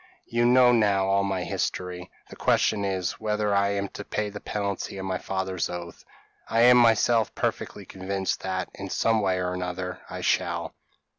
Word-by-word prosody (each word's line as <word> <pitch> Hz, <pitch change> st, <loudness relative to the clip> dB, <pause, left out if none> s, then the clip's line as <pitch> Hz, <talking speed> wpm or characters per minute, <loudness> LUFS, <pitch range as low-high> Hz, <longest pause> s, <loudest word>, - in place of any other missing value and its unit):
You 120 Hz, +1 st, +1 dB
now 125 Hz, 0 st, +6 dB
know 100 Hz, -4 st, +3 dB
all 100 Hz, 0 st, +3 dB
my 95 Hz, -2 st, -1 dB
history. 90 Hz, 0 st, -3 dB, 0.2 s
The -, -, -9 dB
question 105 Hz, -2 st, +2 dB
is, 95 Hz, -2 st, -2 dB
whether 105 Hz, -1 st, 0 dB
I 100 Hz, 0 st, +3 dB
am 100 Hz, 0 st, -1 dB
to 105 Hz, -, -8 dB
pay 105 Hz, 0 st, -3 dB
the 105 Hz, -, -7 dB
penalty 100 Hz, -1 st, -3 dB
of 95 Hz, -, -5 dB
my 95 Hz, -1 st, -2 dB
father's 95 Hz, -2 st, -2 dB
oath? 85 Hz, -1 st, -7 dB, 0.5 s
I 115 Hz, -, +2 dB
am 125 Hz, +1 st, +8 dB
myself 115 Hz, -1 st, +3 dB
perfectly -, -, -3 dB
convinced 95 Hz, 0 st, -3 dB
that, 95 Hz, -1 st, -3 dB
in 100 Hz, -1 st, -7 dB
some 110 Hz, +3 st, +2 dB
way 95 Hz, -2 st, +1 dB
or 90 Hz, 0 st, -1 dB
another, 90 Hz, 0 st, -4 dB
I -, -, -6 dB
shall." -, -, 0 dB
100 Hz, 175 wpm, -26 LUFS, 95-105 Hz, 0.5 s, am